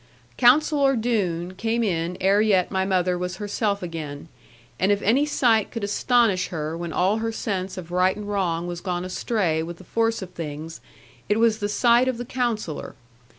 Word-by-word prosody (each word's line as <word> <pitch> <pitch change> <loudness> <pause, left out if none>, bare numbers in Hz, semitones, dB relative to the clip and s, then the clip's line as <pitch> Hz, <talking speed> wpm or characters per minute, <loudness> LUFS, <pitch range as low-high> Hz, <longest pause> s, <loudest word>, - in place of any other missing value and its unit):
Counsellor 275 - +4
Doone 190 -7 -1
came 225 +4 -1
in 175 -3 -1
ere 195 +2 +3
yet 195 -4 +2
my 190 -1 0
mother 180 -2 +1
was 180 0 -3
herself 205 0 -2
again; 160 -3 -6 0.5
and 190 +2 +3
if 205 - +2
any 265 +8 +3
sight 230 -7 +2
could 230 -3 -6
astonish 210 -2 +2
her 155 -1 -4
when 170 0 -5
all 190 +6 +2
her 225 0 -2
sense 195 -4 -3
of 175 -2 -8
right 180 +1 +2
and 210 0 -7
wrong 175 -5 -1
was 175 -1 -5
gone 180 -1 -3
astray 185 -4 -1
with 170 +1 -6
the 185 - -13
force 225 +2 0
of 185 - -10
things, 160 -1 -7 0.5
it 210 +1 +2
was 225 -1 +3
the 205 - -2
sight 240 +3 +4
of 255 -2 -1
the 245 - -5
Counsellor. 235 - -3
195 Hz, 185 wpm, -24 LUFS, 175-225 Hz, 0.5 s, Counsellor